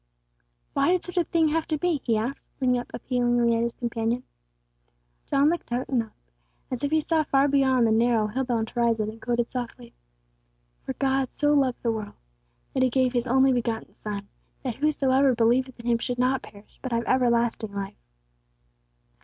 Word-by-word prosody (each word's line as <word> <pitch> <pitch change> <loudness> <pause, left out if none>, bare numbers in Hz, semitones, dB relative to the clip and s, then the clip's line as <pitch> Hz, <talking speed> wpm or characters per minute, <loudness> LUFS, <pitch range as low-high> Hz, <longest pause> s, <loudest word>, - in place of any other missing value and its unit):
"Why - - +2
did 365 - 0
such 355 0 -9
a 350 - +4
thing 320 -1 +2
have 320 +1 -1
to 310 - 0
be?" 325 -3 0
he 230 -3 +1
asked, 240 +6 -3 0.2
looking 250 -2 +2
up 245 - -8
appealingly 240 -2 +1
at 230 - +1
his 235 0 -1
companion. 235 0 -2 1.0
John 280 +2 +3
looked 340 -6 -3
out 245 +2 -2
and 255 -3 +2
up, 220 -1 -10 0.6
as 255 +1 -4
if 285 - +1
he 315 +1 +3
saw 315 +1 +1
far 275 -1 +3
beyond 265 -3 +3
the 225 - +3
narrow, 225 0 +3
hill 240 +6 -2
bound 230 -3 -1
horizon, 230 -3 +1
and 225 0 -15
quoted 240 -1 -1
softly: 240 -1 -6 0.9
"_For - - -4
God 270 -1 +1
so 295 0 +2
loved 270 -4 +1
the 235 - +2
world, 215 -2 -5 0.6
that - - 0
He 260 - +4
gave 255 0 +1
His 240 0 0
only 265 +2 +4
begotten 230 -2 -2
Son, 200 -1 -6 0.4
that 250 -4 -3
whosoever 275 -3 +3
believeth 245 +3 +1
in 235 - -10
Him 235 -1 +2
should 245 +1 -3
not 255 +2 +1
perish, 205 +1 -16
but 260 - -5
have 235 0 0
everlasting 235 -4 +1
life. 195 - -5
245 Hz, 185 wpm, -26 LUFS, 230-270 Hz, 1.0 s, a